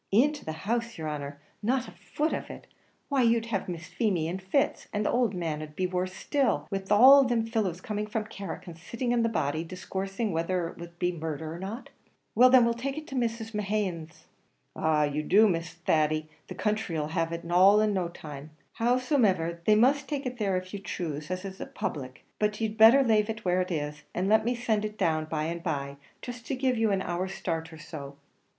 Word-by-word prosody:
"Into 285 +9 +3
the 160 - -4
house, 230 0 -1
yer 160 - -5
honer! 145 -1 -5 0.2
not 255 +4 0
a - - -10
foot 305 +2 -2
of - - -4
it! - - -9 0.4
why, 275 -2 +2
you'd 230 -1 +3
have 195 -2 -1
Miss 170 -2 -5
Feemy 185 -8 0
in 180 +3 -3
fits; 270 +10 0
and 210 0 -1
the - - +2
owld 240 -5 +1
man'd 155 -3 -4
be 185 - 0
worse 185 0 -2
still, 280 +3 0
wid 195 0 -4
all 265 +7 +9
thim 235 -2 +1
fellows 210 -6 -1
coming 210 +1 -3
from 215 0 -2
Carrick 200 -2 -7
and 170 -3 -9
sitting 235 +8 -2
on 240 - +2
the 230 - +2
body, 155 -6 -1
discoursing 195 +4 -4
whether 170 +1 -1
it - - -13
wor 170 - -6
to 170 - -21
be 175 +1 -1
murdher 160 -1 -5
or 170 - -7
not." 205 +7 -6 0.4
"Well, 250 +3 +7
then; 255 -2 +7
we'll 235 - +2
take 270 +4 -4
it 310 - -5
to 270 - -6
Mrs. 230 -2 -2
Mehan's." 190 -6 -3 0.5
"Av 150 -2 +1
you 150 - 0
do, 205 +8 +5
Mr. 170 -4 -1
Thady, 155 0 +2 0.2
the 185 - -7
country 210 -4 -1
'll 150 0 -2
have 165 0 -1
it 170 0 -5
all 190 +4 +7
in 215 -1 +2
no 185 -3 0
time. 150 -3 -9 0.3
Howsomever, 230 - +2
they 215 - +6
must 265 +5 +3
take 285 -2 -3
it 250 -1 -4
there 195 -3 +1
if 185 +1 -6
you 200 - -4
choose, 155 -6 -5
as 185 +1 -3
it's 190 0 -7
a - - -5
public; 130 -3 -5
but 210 0 0
you'd 220 -1 -1
better 230 +5 +8
lave 215 -3 +3
it 225 -1 -5
where 180 0 +2
it 180 - -3
is, 150 -3 -3
and 180 +2 0
let 220 +1 +4
me 245 +1 +1
send 225 -3 0
it 210 0 -4
down 155 -4 +1
by 155 -1 -2
and 170 +2 -3
by 140 -5 -3 0.3
jist 245 -2 -7
to 270 - -1
give 260 -1 +1
you 225 -1 +2
an 195 -1 +1
hour's 185 +2 -3
start 165 -1 -3
or 160 - -10
so." 145 -3 -8
195 Hz, 220 wpm, -28 LUFS, 165-230 Hz, 0.5 s, all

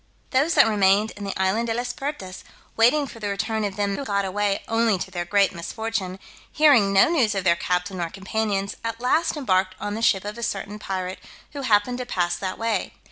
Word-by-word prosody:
Those 290 +5 +2
that - - +7
remained 210 0 +3
in 205 - -8
the 195 - -4
island 195 +5 +1
De 225 - -1
las 245 +1 -2
Pertas, 270 -11 -6 0.3
waiting 250 +6 +4
for 235 - -11
the 210 - -3
return 220 +2 -2
of 200 -2 -2
them 200 -1 -1
who 280 - -4
got 200 -5 0
away 200 +1 -1
only 225 -2 +2
to 185 +2 -6
their 175 -1 -3
great 200 +2 +2
misfortune, 190 +1 -4 0.3
hearing 280 -10 +5
no 195 0 +6
news 255 -11 +2
of 195 - -1
their 170 -2 +4
captain 180 +2 -2
nor 170 -2 -2
companions, 195 +1 -2
at 230 0 -3
last 310 +7 +1
embarked 185 -8 +1
on 205 - -3
the 220 - -4
ship 195 -4 +2
of 210 +3 -6
a - - -6
certain 210 -2 -4
pirate, 185 -2 -4 0.3
who 285 - -5
happened 245 0 +2
to 250 - -5
pass 175 -5 0
that 185 -1 -4
way. 225 -4 -1
205 Hz, 215 wpm, -24 LUFS, 190-230 Hz, 0.3 s, that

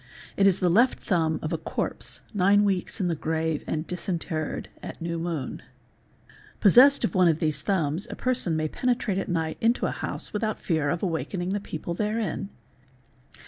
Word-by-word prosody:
It 195 - +4
is 190 -1 +3
the 180 - +2
left 235 +9 +3
thumb 160 -4 +1
of 155 - -2
a 165 - -1
corpse 160 - -4
nine 205 +1 +4
weeks 195 +1 -1
in 185 - +1
the 170 - +1
grave 160 0 -1
and 155 +1 -2
disinterred 170 -3 -3
at - - -8
new 170 0 -3
moon. 165 -5 -4 1.0
Possessed 255 +8 +7
of 230 - 0
one 185 -3 +5
of 160 -2 +3
these 155 -3 -1
thumbs 170 -2 0
a - - -5
person 250 -10 0
may 155 0 0
penetrate 240 0 0
at 195 - -4
night 160 -2 -1
into 230 +2 +2
a - - 0
house - - -2
without 215 +1 -1
fear 155 -4 0
of 170 +5 -2
awaking 175 +1 -2
the 205 +2 0
people 170 -3 -5
therein. 210 -1 -2
180 Hz, 180 wpm, -26 LUFS, 160-205 Hz, 1.0 s, Possessed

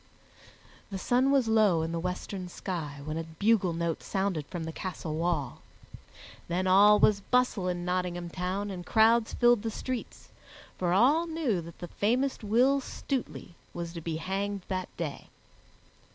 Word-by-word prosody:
The 195 - -4
sun 250 +7 +2
was 275 -4 +3
low 210 -7 +4
in 165 - -3
the 170 - -2
western 180 +1 -4
sky 155 -6 -5
when 155 +1 -3
a - - -3
bugle 190 +4 +1
note 165 -1 -2
sounded 190 -7 -2
from 175 -3 -5
the 160 - -4
castle 165 -2 -5
wall. 160 -6 -1 0.9
Then 180 +2 -1
all 200 +3 +7
was 210 -2 +4
bustle 250 -5 +1
in 175 -1 -2
Nottingham 180 -1 -2
Town 190 +3 -3
and 180 -2 -6
crowds 225 +3 +3
filled 240 -3 +4
the 225 - -2
streets, 255 +2 -6 0.5
for 175 -2 -1
all 275 - +4
knew 300 - -1
that 170 0 -11
the 175 - -7
famous 250 +9 0
Will 250 +6 +3
Stutely 260 -9 -5 0.2
was 170 -1 -5
to 170 - -6
be 160 0 -3
hanged 195 +3 -3
that 185 -1 -2
day. 155 -4 -5
185 Hz, 160 wpm, -29 LUFS, 170-225 Hz, 0.9 s, all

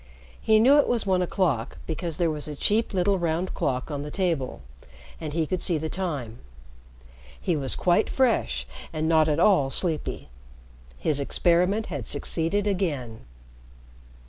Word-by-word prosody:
He 220 - +4
knew 265 +7 +6
it - - +3
was 235 -4 0
one 185 -2 +2
o'clock, 165 - -1
because 165 0 -4
there 170 -2 +1
was 150 -1 -5
a 150 - -5
cheap 215 +9 +1
little 195 0 +1
round 170 +2 -1
clock 130 +3 -2
on 145 -1 -3
the 150 - -6
table, 160 - -2 0.6
and 155 - -5
he 160 +1 0
could 180 +3 -2
see 170 -4 +1
the 160 +1 -3
time. 145 -12 -4 1.0
He 160 - 0
was 135 -3 0
quite 175 -1 +2
fresh 255 -4 +1 0.3
and 155 0 -2
not 160 -1 +4
at 150 +1 +1
all 175 -8 +4
sleepy. 160 +1 -1 0.7
His 145 - 0
experiment 180 +8 +2
had 135 -6 -5
succeeded 165 +7 0
again. 145 - -2
165 Hz, 155 wpm, -26 LUFS, 145-190 Hz, 1.0 s, knew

